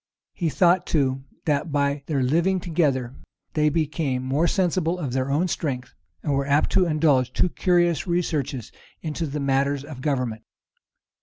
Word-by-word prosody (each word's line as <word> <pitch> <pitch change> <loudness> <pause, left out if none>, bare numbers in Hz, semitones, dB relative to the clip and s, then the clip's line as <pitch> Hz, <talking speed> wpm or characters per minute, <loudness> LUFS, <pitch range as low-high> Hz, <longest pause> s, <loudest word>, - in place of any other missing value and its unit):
He 170 -3 -1
thought 175 +3 +3
too, 135 -3 0 0.2
that 150 +1 0
by 140 0 +1
their 140 -4 0
living 170 +8 +2
together, 145 -8 0 0.4
they 150 -1 +3
became 150 -4 -1
more 140 +6 +1
sensible 180 -1 +1
of 145 -8 -4
their 130 +1 0
own 155 +6 +1
strength, 135 -7 -3 0.3
and 145 - 0
were 135 0 0
apt 145 +1 +2
to 185 - +3
indulge 150 -6 +2
too 180 - +1
curious 175 -2 +1
researches 155 -8 -1 0.3
into 160 +1 -3
matters 140 0 +1
of 145 -3 -9
government. 125 -6 -1
150 Hz, 150 wpm, -24 LUFS, 135-170 Hz, 0.4 s, thought